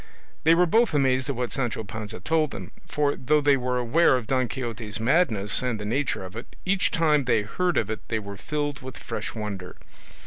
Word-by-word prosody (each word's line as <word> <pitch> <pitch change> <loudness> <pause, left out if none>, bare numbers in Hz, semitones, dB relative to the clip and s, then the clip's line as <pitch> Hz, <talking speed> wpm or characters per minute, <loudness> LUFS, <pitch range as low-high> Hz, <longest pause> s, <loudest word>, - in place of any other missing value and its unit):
They 165 +1 +7
were 180 +1 +5
both 220 0 +3
amazed 130 -1 +2
at 140 - -1
what 125 0 -2
Sancho 120 -4 -2
Panza 105 +1 -7
told 160 -2 +1
them; 95 -7 -8 0.2
for 145 -1 +1
though 150 +4 +2
they 145 -1 +4
were 125 -1 -1
aware 130 +4 +4
of 125 - -5
Don 130 +1 +1
Quixote's 115 -3 -4
madness 115 - +2
and 125 -4 -1
the 105 - -5
nature 125 -3 -1
of 95 - -10
it, 120 - -9
each 190 0 +2
time 150 -4 +2
they 115 -4 +2
heard 180 - -1
of 105 - +1
it 110 - -6
they 115 - -1
were 100 -2 -6
filled 145 +6 -3
with 130 -1 -8
fresh - - -5
wonder. 100 -4 -5
125 Hz, 210 wpm, -26 LUFS, 110-150 Hz, 0.2 s, They